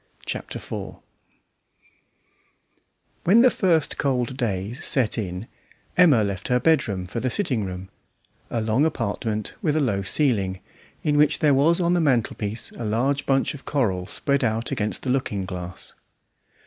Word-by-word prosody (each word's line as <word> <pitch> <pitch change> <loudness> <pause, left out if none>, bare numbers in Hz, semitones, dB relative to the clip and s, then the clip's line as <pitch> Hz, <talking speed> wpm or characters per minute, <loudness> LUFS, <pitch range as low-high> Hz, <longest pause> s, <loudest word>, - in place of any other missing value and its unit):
Chapter - - -5
Four - - -7 2.3
When 210 +7 +6
the 255 - +6
first 165 -6 +1
cold 130 -2 0
days 110 -2 -3
set 125 -6 +3
in 90 0 -4 0.5
Emma 155 -11 +6
left 100 -2 -3
her 125 0 +2
bedroom 115 - +1
for 95 +6 -4
the 130 - -1
sitting 125 - 0
room, 95 0 -6 0.6
a 115 - -1
long 110 +5 +2
apartment 110 -8 -1
with 150 -3 +1
a - - +3
low 105 -9 0
ceiling, 100 -5 +1 0.4
in 150 -1 +2
which 150 0 +4
there 150 -2 +3
was 155 +6 +4
on 175 0 +2
the 175 - +2
mantelpiece 115 -5 0
a - - -7
large 130 +6 0
bunch 135 -1 +2
of 145 - -11
coral 95 -11 0
spread 140 +6 0
out 115 +2 0
against 105 -6 -2
the 130 - 0
looking 105 -7 -1
glass. 90 0 -7
125 Hz, 150 wpm, -24 LUFS, 105-145 Hz, 2.3 s, When